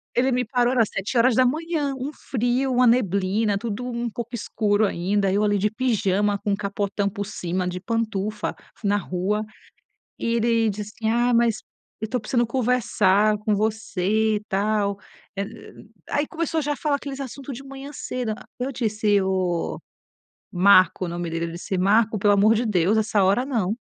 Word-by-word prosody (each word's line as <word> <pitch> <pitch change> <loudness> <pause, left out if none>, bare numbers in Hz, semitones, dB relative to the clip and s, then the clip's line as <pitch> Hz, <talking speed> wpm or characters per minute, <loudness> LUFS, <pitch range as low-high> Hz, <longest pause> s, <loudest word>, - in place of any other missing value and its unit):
Ele 260 +2 +3
me 250 0 +1
parou 245 +1 +1
era 240 - +4
7h. 255 - +1
Um 265 +3 -4
frio, 250 +1 -1
uma 250 0 +4
neblina, 200 -2 +2
tudo 225 +3 -4
um 235 -1 -3
pouco 235 +1 -7
escuro 215 -2 +1
ainda. 195 +1 0
Eu 205 +2 +2
ali 205 -1 +2
de 205 +2 +1
pijama, 210 -4 +1
com 205 - -2
um 200 - +2
capotão 200 0 -2
por 200 +1 -5
cima, 180 -2 -3
de 180 0 -3
pantufa 215 0 -2 0.3
na 205 0 +2
rua 200 +3 -1 0.8
e - - -3
ele 230 -1 +2
disse 210 +1 -6
assim: 220 -1 +1
"Ah, 240 +2 +2
mas 230 -2 +2 0.4
eu 220 - -3
tô 250 +3 -1
precisando 240 +2 0
conversar 215 -4 +2
com 210 0 0
você 215 0 0
e - - -3
tal 200 0 0 0.4
eh 200 - -1 0.7
aí 290 +1 +1
começou 330 -2 -2
já 295 0 -1
a - - -3
falar 295 -1 0
aqueles 280 -1 -7
assuntos 275 +1 -6
de 270 - -9
manhã 275 +1 -9
cedo. 250 -4 -4
A 215 - -9 0.2
eu 260 +2 -2
disse: 215 -4 +1
"Oh 185 -3 -1 0.7
Marco", 185 -1 +5
o - - -5
nome 175 0 -4
dele, 165 +1 -2
eu 165 - -7
disse: 175 +3 -4
"Marco, 215 +3 +3
pelo 205 0 +4
amor 210 +3 +5
de 230 +2 0
Deus, 195 0 +2
essa 210 -2 +2
hora 200 +7 +3
não". 225 -7 -1
215 Hz, 175 wpm, -24 LUFS, 200-245 Hz, 0.8 s, Marco